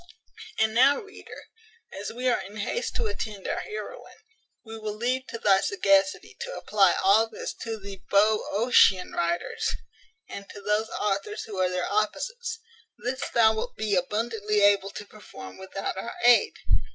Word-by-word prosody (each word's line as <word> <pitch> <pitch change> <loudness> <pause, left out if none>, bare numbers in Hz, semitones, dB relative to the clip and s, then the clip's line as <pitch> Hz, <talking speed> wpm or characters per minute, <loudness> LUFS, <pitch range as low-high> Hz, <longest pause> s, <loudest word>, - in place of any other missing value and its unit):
And 220 0 +2
now, 265 +5 +5
reader, 405 -2 -12 0.5
as 195 +1 -5
we 250 +3 -3
are 245 - +2
in 200 +3 -10
haste 215 - -3
to 475 - -1
attend 215 - -4
our - - -1
heroine, 440 +3 -8 0.5
we 225 0 -8
will 215 -1 -4
leave 255 +4 -1
to - - -6
thy 195 -3 +4
sagacity 195 -1 +1
to - - -5
apply 195 -4 +3
all 215 +4 +5
this 220 - -6
to 225 -1 -4
the 195 -1 -9
Boeotian 210 -1 +4
writers, 170 0 -1 0.5
and 200 0 -9
to - - -10
those 210 +2 0
authors 210 - -2
who 205 -4 -7
are 185 -1 +2
their 180 0 -2
opposites. 455 - -2 0.4
This 250 +4 -3
thou 220 -2 +4
wilt 220 - -4
be 215 -2 0
abundantly 210 +2 0
able 200 -1 +4
to 205 - -8
perform 150 - -12
without 190 +1 -5
our 230 +5 -5
aid. 245 -1 +6
210 Hz, 160 wpm, -26 LUFS, 195-235 Hz, 0.5 s, aid